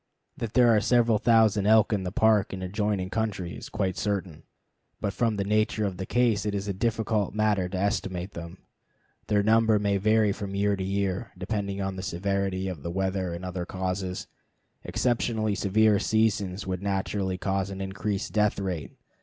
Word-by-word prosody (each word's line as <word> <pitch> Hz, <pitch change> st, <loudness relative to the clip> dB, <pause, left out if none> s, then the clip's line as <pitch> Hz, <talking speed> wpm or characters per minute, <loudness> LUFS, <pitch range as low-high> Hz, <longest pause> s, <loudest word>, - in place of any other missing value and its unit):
That 115 Hz, -1 st, -5 dB
there 120 Hz, -3 st, +6 dB
are 105 Hz, -, +3 dB
several 115 Hz, -2 st, +3 dB
thousand 110 Hz, -3 st, +4 dB
elk 110 Hz, 0 st, +5 dB
in 100 Hz, -, 0 dB
the 90 Hz, -1 st, -4 dB
Park 110 Hz, -1 st, +3 dB
and 95 Hz, -1 st, -5 dB
adjoining 100 Hz, 0 st, -1 dB
country 105 Hz, -6 st, -2 dB
is -, -, -9 dB
quite 95 Hz, -2 st, -2 dB
certain, 95 Hz, -5 st, -2 dB, 0.6 s
but 100 Hz, -, -2 dB
from 115 Hz, -1 st, +1 dB
the 100 Hz, -, -1 dB
nature 110 Hz, +1 st, +1 dB
of 95 Hz, -3 st, -3 dB
the 95 Hz, -, -5 dB
case 120 Hz, -5 st, +2 dB
it 105 Hz, -1 st, -2 dB
is 100 Hz, 0 st, -3 dB
a 100 Hz, -, -1 dB
difficult 110 Hz, -1 st, -1 dB
matter 105 Hz, -4 st, +1 dB
to 95 Hz, -, -4 dB
estimate 95 Hz, -2 st, -1 dB
them. 85 Hz, +1 st, -8 dB, 0.7 s
Their 105 Hz, -1 st, +2 dB
number 110 Hz, 0 st, +4 dB
may 100 Hz, -1 st, +1 dB
vary 110 Hz, +1 st, +3 dB
from 100 Hz, -1 st, -5 dB
year 100 Hz, 0 st, +2 dB
to 95 Hz, -, -4 dB
year, 100 Hz, +2 st, -2 dB
depending 100 Hz, +1 st, -3 dB
upon 95 Hz, -1 st, -3 dB
the -, -, -4 dB
severity 95 Hz, +1 st, -1 dB
of 90 Hz, -6 st, -5 dB
the 85 Hz, -, -5 dB
winter 95 Hz, 0 st, -1 dB
and 90 Hz, +2 st, -7 dB
other 90 Hz, -1 st, -3 dB
causes. 95 Hz, 0 st, -3 dB, 0.6 s
Exceptionally 115 Hz, -3 st, 0 dB
severe 105 Hz, +1 st, +3 dB
seasons 105 Hz, -3 st, 0 dB
would 95 Hz, -1 st, -3 dB
naturally 95 Hz, -1 st, -1 dB
cause 95 Hz, 0 st, -1 dB
an 95 Hz, -1 st, -6 dB
increased 100 Hz, +1 st, -3 dB
death 105 Hz, -1 st, +2 dB
rate. 90 Hz, -6 st, -4 dB
100 Hz, 180 wpm, -27 LUFS, 95-110 Hz, 0.7 s, there